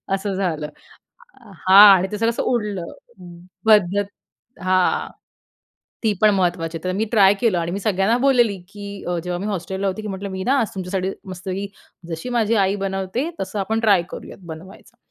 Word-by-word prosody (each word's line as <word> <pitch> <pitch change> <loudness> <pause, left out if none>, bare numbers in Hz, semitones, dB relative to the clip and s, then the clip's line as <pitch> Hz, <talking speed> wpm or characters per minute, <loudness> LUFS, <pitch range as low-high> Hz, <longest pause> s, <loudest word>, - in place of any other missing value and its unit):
असं 195 +1 -3
झालं 170 -6 -2 1.0
हां 195 +2 +10
आणि 185 +1 -1
ते 210 - -3
सगळ 225 +1 +1
असं 235 - -2
उडलं. 210 -7 -2 0.8
पद्धत 205 -2 +4 0.6
हां, 185 0 +1 0.9
ती 220 -2 +2
पण 215 - +7
महत्त्वाची 175 -3 -1
आहे. 160 - -20
तर 185 - -1
मी 215 - +1
ट्राय 200 -3 +6
केलं 225 -7 +2
आणि 170 0 -2
मी 195 - -2
सगळ्यांना 200 +2 +1
बोललेली 245 -6 +3
की 205 +1 -10 0.2
अ, 175 -1 -1
जेव्हा 180 -1 -3
मी 200 - -4
हॉस्टेलला 190 0 -3
होती 190 +3 -4
की 215 - -5
म्हटलं, 195 0 -5
"मी 190 0 -5
ना 260 - +2
आज 225 - -1
तुमच्यासाठी 190 0 -2 0.2
मस्तपैकी, 185 +2 -5 0.4
जशी 165 +8 -5
माझी 225 -1 +2
आई 195 +2 0
बनवते 195 - -2
तसं 200 +2 -4
आपण 220 +3 -1
ट्राय 205 -6 +4
करूयात - - -9
बनवायचं 180 +5 -12
195 Hz, 175 wpm, -21 LUFS, 185-215 Hz, 1.0 s, हां